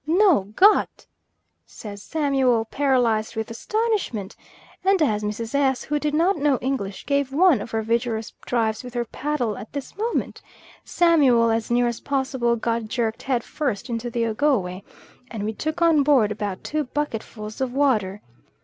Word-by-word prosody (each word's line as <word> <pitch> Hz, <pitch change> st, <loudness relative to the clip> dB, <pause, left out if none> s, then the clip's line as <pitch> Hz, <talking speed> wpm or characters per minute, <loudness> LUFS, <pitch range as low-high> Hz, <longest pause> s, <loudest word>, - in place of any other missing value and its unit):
"No 345 Hz, -, +4 dB
got," 415 Hz, +3 st, +4 dB, 0.6 s
says 200 Hz, -2 st, -9 dB
Samuel, 270 Hz, -6 st, +1 dB
paralysed 240 Hz, -4 st, +1 dB
with 220 Hz, +1 st, -4 dB
astonishment; 395 Hz, -, -2 dB, 0.5 s
and 385 Hz, 0 st, +3 dB
as 215 Hz, -10 st, +1 dB
Mrs. 220 Hz, +3 st, -4 dB
S., 270 Hz, -2 st, +1 dB
who 295 Hz, 0 st, -1 dB
did 300 Hz, 0 st, -1 dB
not 345 Hz, +4 st, +2 dB
know 285 Hz, -2 st, +2 dB
English, 220 Hz, -7 st, -3 dB
gave 280 Hz, -1 st, 0 dB
one 310 Hz, -, +4 dB
of 230 Hz, -, -7 dB
her 225 Hz, 0 st, -2 dB
vigorous 230 Hz, 0 st, -1 dB
drives 225 Hz, -2 st, 0 dB
with 250 Hz, 0 st, -10 dB
her 240 Hz, 0 st, -1 dB
paddle 250 Hz, -5 st, -2 dB
at 215 Hz, -, -11 dB
this 280 Hz, -2 st, -6 dB
moment, 450 Hz, +3 st, -2 dB, 0.4 s
Samuel 275 Hz, -10 st, +4 dB
as 225 Hz, 0 st, -1 dB
near 240 Hz, 0 st, +3 dB
as 235 Hz, -1 st, -2 dB
possible 265 Hz, -4 st, 0 dB
got 230 Hz, 0 st, -1 dB
jerked 230 Hz, 0 st, -2 dB
head 255 Hz, -3 st, -1 dB
first 265 Hz, -5 st, -3 dB
into 235 Hz, +1 st, -3 dB
the 235 Hz, 0 st, -1 dB
Ogowe, 215 Hz, -6 st, 0 dB, 0.5 s
and 220 Hz, -4 st, -5 dB
we 215 Hz, +1 st, -2 dB
took 315 Hz, +8 st, -2 dB
on 325 Hz, -3 st, +5 dB
board 270 Hz, -7 st, +3 dB
about 205 Hz, -2 st, -4 dB
two 305 Hz, -1 st, -2 dB
bucketfuls 225 Hz, -5 st, -5 dB
of 260 Hz, -2 st, -1 dB
water. 220 Hz, -8 st, +1 dB
245 Hz, 160 wpm, -23 LUFS, 220-290 Hz, 0.6 s, on